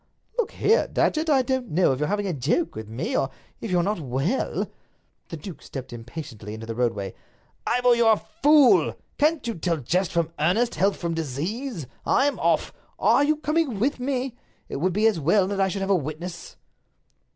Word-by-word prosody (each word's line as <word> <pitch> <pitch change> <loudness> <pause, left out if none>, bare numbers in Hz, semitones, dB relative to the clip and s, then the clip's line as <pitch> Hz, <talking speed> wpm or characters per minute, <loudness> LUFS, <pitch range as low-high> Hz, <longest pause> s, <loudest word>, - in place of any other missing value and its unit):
"Look 475 - 0
here, 450 +4 +3
Datchet, 315 +1 +1
I 270 -3 +4
don't 255 -2 -1
know 170 -3 +3
if 130 - -4
you're 150 - 0
having 205 +2 -1
a 185 - -1
joke 150 - 0
with 110 -1 -7
me, 115 +4 -3
or 135 - +1 0.3
if 225 - -5
you're 180 -2 +2
not 205 0 -1
well—" 140 - -1 0.6
The 165 - -5
duke 170 +3 -9
stepped 130 -2 -8
impatiently 115 -3 -8
into 110 +1 -8
the 115 - -4
roadway. 110 -5 -1 0.5
"Ivor, 245 0 +4
you're 235 -2 +5
a - - +1
fool! 290 +1 +4 0.2
Can't 305 +1 +2
you 230 - -1
tell 170 -2 -1
jest 175 +7 0
from 170 -1 0
earnest, 205 +10 +2
health 195 +5 +1
from 170 -1 -2
disease? 165 - -3 0.2
I'm 285 +1 +2
off! - - +1 0.2
Are 280 - +4
you 305 +2 +3
coming 305 -5 0
with 255 +4 +1
me? 255 -1 -2 0.3
It - - -4
would 180 +6 +1
be 210 +3 +2
as 215 -6 +3
well 175 +6 +3
that 195 0 -1
I 190 - +4
should 195 +1 -3
have 195 +1 0
a - - +5
witness." 165 +2 -5
190 Hz, 195 wpm, -25 LUFS, 150-250 Hz, 0.6 s, you're